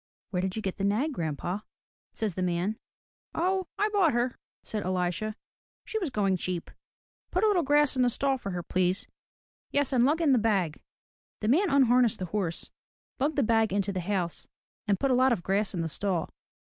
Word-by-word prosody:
"Where 180 Hz, -2 st, 0 dB
did 190 Hz, 0 st, -2 dB
you 220 Hz, -, -4 dB
get 190 Hz, -, -3 dB
the 195 Hz, -, -3 dB
nag, 225 Hz, +10 st, +1 dB
grandpa?'* 170 Hz, -, -3 dB, 0.5 s
says 215 Hz, -4 st, -2 dB
the 185 Hz, -, -4 dB
man. 180 Hz, +4 st, -1 dB, 0.6 s
*'0, 370 Hz, +2 st, +1 dB
I 420 Hz, -, +2 dB
bought 390 Hz, -8 st, +3 dB
her,'* 240 Hz, +1 st, 0 dB, 0.3 s
says 210 Hz, -2 st, -3 dB
EHsha, 185 Hz, +4 st, -1 dB, 0.5 s
*'She 440 Hz, -, -2 dB
was 360 Hz, -7 st, -2 dB
going 200 Hz, -6 st, +1 dB
cheap. 180 Hz, -1 st, -3 dB, 0.6 s
Put -, -, 0 dB
a -, -, +5 dB
little 400 Hz, -4 st, +3 dB
grass 295 Hz, -1 st, +3 dB
in 255 Hz, -, +2 dB
the 245 Hz, -, +4 dB
stall 270 Hz, +2 st, +1 dB
for 200 Hz, -, -5 dB
her, 180 Hz, -2 st, -3 dB
please. 185 Hz, +2 st, 0 dB, 0.6 s
Yes, 285 Hz, -1 st, +1 dB
and 245 Hz, -2 st, +4 dB
lug 295 Hz, +5 st, +3 dB
in 320 Hz, -4 st, +3 dB
the 255 Hz, -, +5 dB
bag.*' 195 Hz, -8 st, 0 dB, 0.6 s
The 215 Hz, -, 0 dB
man 355 Hz, +9 st, +4 dB
unharnessed 250 Hz, -4 st, +4 dB
the 185 Hz, -, -3 dB
horse, 180 Hz, -2 st, -2 dB, 0.5 s
lugged 290 Hz, +4 st, +1 dB
the 285 Hz, -, +2 dB
bag 225 Hz, -2 st, +3 dB
into 200 Hz, 0 st, 0 dB
the 185 Hz, -, -2 dB
house, 180 Hz, -2 st, -2 dB, 0.4 s
and 200 Hz, -2 st, +2 dB
put 275 Hz, -, +1 dB
a -, -, +4 dB
lot 255 Hz, +1 st, +4 dB
of 185 Hz, -7 st, -3 dB
grass 200 Hz, +2 st, +1 dB
in 175 Hz, -, -2 dB
the 165 Hz, -, -1 dB
stall. 175 Hz, +1 st, -1 dB
215 Hz, 200 wpm, -28 LUFS, 185-270 Hz, 0.6 s, a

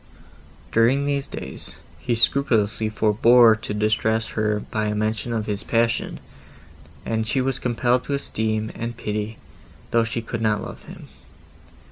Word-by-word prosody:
During 125 Hz, +5 st, +3 dB
these 140 Hz, -1 st, -1 dB
days, -, -, -6 dB, 0.2 s
he 120 Hz, -, -1 dB
scrupulously 110 Hz, -4 st, +2 dB
forbore 110 Hz, +2 st, +5 dB
to -, -, -5 dB
distress 110 Hz, +1 st, +1 dB
her 105 Hz, -1 st, 0 dB
by 110 Hz, -1 st, 0 dB
a 105 Hz, -, -1 dB
mention 110 Hz, +2 st, -1 dB
of 110 Hz, -2 st, -1 dB
his 105 Hz, -2 st, -3 dB
passion, 115 Hz, 0 st, 0 dB, 0.9 s
and 110 Hz, -1 st, -1 dB
she 130 Hz, -, 0 dB
was 130 Hz, 0 st, 0 dB
compelled 125 Hz, +1 st, +1 dB
to 140 Hz, -, -1 dB
esteem 110 Hz, -4 st, -2 dB
and 115 Hz, 0 st, -5 dB
pity, 105 Hz, 0 st, -3 dB, 0.5 s
though 115 Hz, -1 st, +4 dB
she 115 Hz, 0 st, -3 dB
could 115 Hz, 0 st, -4 dB
not 105 Hz, -2 st, +2 dB
love -, -, -8 dB
him. -, -, -11 dB
110 Hz, 145 wpm, -23 LUFS, 110-120 Hz, 0.9 s, forbore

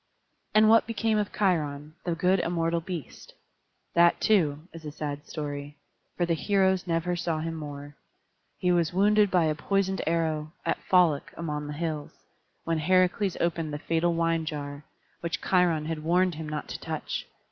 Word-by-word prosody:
And 215 Hz, 0 st, +7 dB
what 225 Hz, +1 st, +5 dB
became 225 Hz, -1 st, +1 dB
of 205 Hz, -, -2 dB
Cheiron, 150 Hz, -6 st, 0 dB
the 175 Hz, -2 st, 0 dB
good 180 Hz, +2 st, +2 dB
immortal 170 Hz, -1 st, 0 dB
beast? 170 Hz, -4 st, -8 dB, 0.6 s
That, 170 Hz, 0 st, +5 dB
too, 160 Hz, -7 st, +2 dB
is 165 Hz, -1 st, -10 dB
a 150 Hz, -, -6 dB
sad 145 Hz, -1 st, -5 dB
story; 145 Hz, -1 st, -5 dB, 0.4 s
for 175 Hz, -, +2 dB
the 170 Hz, -, +1 dB
heroes 190 Hz, +1 st, +1 dB
never 170 Hz, +1 st, 0 dB
saw 165 Hz, -2 st, -1 dB
him 165 Hz, +1 st, -3 dB
more. 145 Hz, -2 st, -7 dB, 0.6 s
He 180 Hz, -, +1 dB
was 170 Hz, -2 st, +2 dB
wounded 210 Hz, +1 st, +4 dB
by 180 Hz, -3 st, +3 dB
a 155 Hz, -, +2 dB
poisoned 190 Hz, +5 st, 0 dB
arrow, 160 Hz, -2 st, 0 dB
at -, -, -1 dB
Pholoc 175 Hz, -6 st, +3 dB
among 150 Hz, -3 st, -3 dB
the 150 Hz, -, -5 dB
hills, 155 Hz, -1 st, -4 dB, 0.5 s
when 165 Hz, -1 st, 0 dB
Heracles 185 Hz, +3 st, +2 dB
opened 165 Hz, -2 st, -1 dB
the 145 Hz, -, -3 dB
fatal 165 Hz, +3 st, 0 dB
wine 165 Hz, -1 st, +1 dB
jar, 145 Hz, -2 st, -5 dB, 0.3 s
which 170 Hz, 0 st, -3 dB
Cheiron 175 Hz, -4 st, +2 dB
had 160 Hz, 0 st, -3 dB
warned 180 Hz, +2 st, +3 dB
him 155 Hz, 0 st, -6 dB
not 150 Hz, -1 st, -4 dB
to -, -, -5 dB
touch. -, -, -4 dB
165 Hz, 170 wpm, -27 LUFS, 150-180 Hz, 0.6 s, And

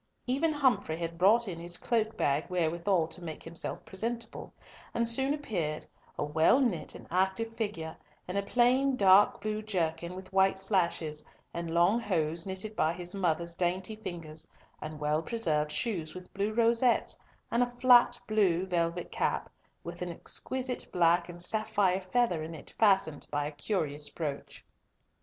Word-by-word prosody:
Even 280 Hz, +6 st, +1 dB
Humfrey 260 Hz, -, +1 dB
had 165 Hz, 0 st, -5 dB
brought 220 Hz, +5 st, +5 dB
in 170 Hz, -3 st, -5 dB
his 175 Hz, +1 st, -3 dB
cloak 220 Hz, -2 st, -1 dB
bag 145 Hz, +2 st, +1 dB
wherewithal 170 Hz, 0 st, +1 dB
to 180 Hz, -, -6 dB
make 160 Hz, -2 st, -7 dB
himself 165 Hz, 0 st, -3 dB
presentable, 230 Hz, +4 st, -4 dB, 0.4 s
and 235 Hz, 0 st, +2 dB
soon 265 Hz, +4 st, +5 dB
appeared, 185 Hz, -, -2 dB, 0.3 s
a -, -, -1 dB
well 160 Hz, -, +4 dB
knit 235 Hz, -, 0 dB
and -, -, -10 dB
active 190 Hz, +5 st, 0 dB
figure, 165 Hz, -8 st, -3 dB, 0.3 s
in 180 Hz, -, -5 dB
a 200 Hz, -, +2 dB
plain 255 Hz, +5 st, +3 dB
dark 200 Hz, -2 st, +5 dB
blue 215 Hz, 0 st, -2 dB
jerkin, 170 Hz, -4 st, -2 dB
with 190 Hz, 0 st, -10 dB
white 190 Hz, 0 st, +4 dB
slashes, 170 Hz, -6 st, 0 dB, 0.3 s
and 170 Hz, -1 st, -4 dB
long 175 Hz, +7 st, +3 dB
hose 165 Hz, -5 st, -1 dB
knitted 195 Hz, +3 st, -4 dB
by 160 Hz, -3 st, +2 dB
his 175 Hz, 0 st, -4 dB
mother's 170 Hz, -3 st, 0 dB
dainty 185 Hz, +4 st, -1 dB
fingers, 165 Hz, -7 st, -7 dB, 0.3 s
and 155 Hz, 0 st, -7 dB
well 150 Hz, +1 st, +1 dB
preserved 155 Hz, -8 st, 0 dB
shoes 170 Hz, -7 st, -2 dB
with 185 Hz, 0 st, -11 dB
blue 200 Hz, +2 st, -1 dB
rosettes, 235 Hz, +2 st, +2 dB, 0.4 s
and 235 Hz, -, +2 dB
a 245 Hz, 0 st, +1 dB
flat 245 Hz, -1 st, +6 dB
blue 190 Hz, -5 st, +2 dB
velvet 175 Hz, -1 st, -1 dB
cap, -, -, -1 dB, 0.3 s
with 170 Hz, +1 st, -8 dB
an 180 Hz, -, -3 dB
exquisite 255 Hz, +8 st, -3 dB
black 170 Hz, 0 st, +3 dB
and 175 Hz, 0 st, -6 dB
sapphire 205 Hz, -2 st, +1 dB
feather 240 Hz, -10 st, +2 dB
in 160 Hz, +1 st, -6 dB
it 145 Hz, -, -10 dB
fastened 190 Hz, -8 st, +3 dB
by 145 Hz, 0 st, -1 dB
a 150 Hz, -, -4 dB
curious 150 Hz, -3 st, -2 dB
brooch. 145 Hz, -2 st, -6 dB
185 Hz, 160 wpm, -30 LUFS, 165-220 Hz, 0.4 s, flat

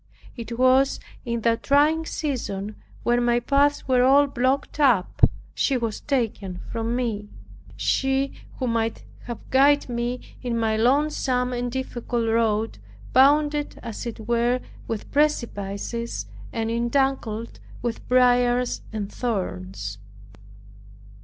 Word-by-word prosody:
It 235 Hz, -1 st, -6 dB
was 260 Hz, +2 st, +4 dB, 0.3 s
in 235 Hz, -1 st, -2 dB
that 230 Hz, 0 st, +1 dB
trying 305 Hz, +3 st, +3 dB
season 215 Hz, -8 st, -3 dB, 0.3 s
when 240 Hz, 0 st, +2 dB
my 240 Hz, 0 st, +3 dB
paths 280 Hz, +4 st, +2 dB
were 255 Hz, -1 st, +4 dB
all 275 Hz, +3 st, +6 dB
blocked 270 Hz, +2 st, -1 dB
up, 245 Hz, -10 st, +3 dB, 0.3 s
she 270 Hz, -, +1 dB
was 230 Hz, -3 st, -2 dB
taken 220 Hz, -9 st, -2 dB
from 230 Hz, +1 st, -1 dB
me. 220 Hz, -5 st, -2 dB, 0.5 s
She 270 Hz, 0 st, +1 dB, 0.2 s
who 260 Hz, -, -2 dB
might 230 Hz, -2 st, -1 dB, 0.2 s
have 235 Hz, -2 st, -7 dB
guided 280 Hz, +1 st, +4 dB
me 240 Hz, +1 st, -2 dB, 0.2 s
in 240 Hz, -2 st, -2 dB
my 220 Hz, -1 st, +1 dB
lonesome 255 Hz, 0 st, +1 dB
and 245 Hz, 0 st, -2 dB
difficult 240 Hz, -2 st, -2 dB
road, 225 Hz, -1 st, +1 dB, 0.3 s
bounded 295 Hz, +3 st, +3 dB
as 230 Hz, +2 st, -5 dB
it 225 Hz, -1 st, -6 dB
were 240 Hz, +1 st, +2 dB, 0.3 s
with 225 Hz, -2 st, -5 dB
precipices, 235 Hz, -, -1 dB, 0.3 s
and 225 Hz, 0 st, -2 dB
entangled 235 Hz, -2 st, -1 dB, 0.2 s
with 235 Hz, -2 st, -3 dB
briars 245 Hz, 0 st, +3 dB
and 210 Hz, -2 st, -4 dB
thorns. 100 Hz, -, -3 dB
240 Hz, 120 wpm, -24 LUFS, 225-265 Hz, 0.5 s, all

